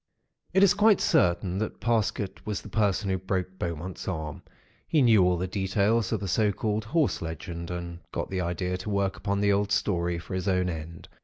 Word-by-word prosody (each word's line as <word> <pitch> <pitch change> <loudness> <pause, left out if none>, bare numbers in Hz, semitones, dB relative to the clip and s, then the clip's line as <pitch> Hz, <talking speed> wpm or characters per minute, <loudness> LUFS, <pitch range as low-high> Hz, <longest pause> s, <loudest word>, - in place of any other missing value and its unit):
"It 190 - +5
is 200 - +6
quite 210 -1 +5
certain 90 - +2
that 110 - -3
Parsket 105 -4 -1
was 105 -1 -4
the - - -9
person 105 -2 +1
who 95 - 0
broke 95 0 -3
Beaumont's 85 +2 -4
arm. 80 -5 -4 0.5
He 155 -4 +3
knew 110 -6 +6
all 90 0 +3
the 90 - -1
details 100 +4 +1
of - - -1
the 100 - -3
so 105 +3 +2
called 105 +1 -2
'Horse 150 +5 +1
Legend,' 85 +1 -5
and 85 -1 -5
got - - -4
the 95 -1 -1
idea 90 +1 -2
to 90 +4 -6
work 100 -1 0
upon 100 0 -1
the 100 0 +4
old 100 +1 0
story, 90 -4 +1
for 85 +3 -8
his 95 +1 -2
own 90 -1 +2
end. 80 +1 -8
95 Hz, 205 wpm, -27 LUFS, 90-105 Hz, 0.5 s, is